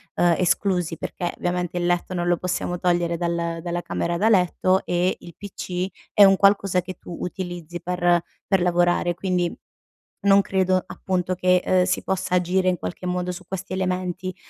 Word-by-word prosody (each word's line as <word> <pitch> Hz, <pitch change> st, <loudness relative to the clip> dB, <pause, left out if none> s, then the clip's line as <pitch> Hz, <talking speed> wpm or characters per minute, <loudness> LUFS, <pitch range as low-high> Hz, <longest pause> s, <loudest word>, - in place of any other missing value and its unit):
ehm, 175 Hz, -1 st, +4 dB
esclusi 180 Hz, -2 st, +1 dB
perché, 175 Hz, -1 st, -4 dB
ovviamente, 180 Hz, 0 st, -2 dB
il 175 Hz, -, 0 dB
letto 175 Hz, +1 st, 0 dB
non 175 Hz, 0 st, -1 dB
lo 175 Hz, 0 st, +3 dB
possiamo 180 Hz, 0 st, -2 dB
togliere 175 Hz, -1 st, +1 dB
dal 170 Hz, -1 st, -2 dB
dalla 175 Hz, 0 st, -3 dB
camera 170 Hz, 0 st, -2 dB
da 210 Hz, +5 st, +2 dB
letto 185 Hz, -1 st, +3 dB
e 175 Hz, +1 st, +1 dB
il 170 Hz, -, -12 dB
PC 185 Hz, -2 st, -4 dB, 0.3 s
è 205 Hz, -, +7 dB
un 195 Hz, -1 st, +7 dB
qualcosa 195 Hz, -2 st, +3 dB
che 185 Hz, +1 st, -8 dB
tu 175 Hz, -, -9 dB
utilizzi 175 Hz, -2 st, -5 dB
per 175 Hz, -1 st, +1 dB, 0.3 s
per 195 Hz, -, +3 dB
lavorare, 175 Hz, 0 st, +2 dB
quindi 180 Hz, -1 st, -1 dB, 0.7 s
non 200 Hz, 0 st, +6 dB
credo, 185 Hz, -1 st, +1 dB
appunto, 185 Hz, -1 st, -2 dB
che, 180 Hz, 0 st, +2 dB
uhm, 185 Hz, -1 st, +4 dB
si 180 Hz, -, 0 dB
possa 185 Hz, -1 st, -1 dB
agire, 185 Hz, +1 st, +2 dB
in 180 Hz, -, -2 dB
qualche 175 Hz, -, -6 dB
modo, 180 Hz, 0 st, -1 dB
su 180 Hz, +1 st, -7 dB
questi 190 Hz, +1 st, -5 dB
elementi. 185 Hz, 0 st, -2 dB
180 Hz, 175 wpm, -23 LUFS, 175-185 Hz, 0.7 s, è